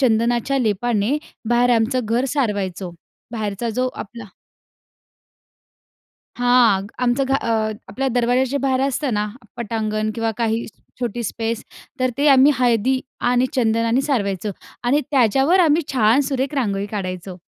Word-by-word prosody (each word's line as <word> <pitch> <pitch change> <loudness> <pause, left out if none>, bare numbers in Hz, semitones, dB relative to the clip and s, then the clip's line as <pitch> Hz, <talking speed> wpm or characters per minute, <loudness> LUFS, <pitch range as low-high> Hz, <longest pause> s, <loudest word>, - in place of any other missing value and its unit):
चंदनाच्या 240 +2 +2
लेपाने 225 +2 0 0.3
बाहेर 240 +1 +3
आमचं 240 +3 +1
घर 235 +4 0
सारवायचो. 195 -8 -2 0.4
बाहेरचा 215 0 -3
जो 255 +3 0
आपला 230 +2 -8 2.1
हां, 245 -6 +4 0.2
आमचं 250 +3 +2
घ 270 - -2
अ, 220 -4 0 0.2
आपल्या 270 +1 -2
दरवाजाचे 250 +3 +1
बाहेर 260 -1 +1
असतं 270 -1 0
ना, 210 0 0 0.3
पटांगण 215 -2 -2
किंवा 225 0 -1
काही 230 0 0 0.4
छोटी 240 -1 -2
स्पेस, 225 +1 -3 0.4
तर 255 0 +2
ते 290 - +2
आम्ही 275 +1 +6
हळदी 250 +1 +2 0.3
आणि 250 +1 +3
चंदनाने 230 0 +2
सारवायचो. 210 -8 -1 0.3
आणि 275 +5 +3
त्याच्यावर 270 - +3
आम्ही 325 0 +4
छान 230 +2 +4
सुरेख 270 +1 -2
रांगोळी 200 -7 -1
काढायचो. 185 -3 -5
240 Hz, 125 wpm, -21 LUFS, 215-260 Hz, 2.1 s, आम्ही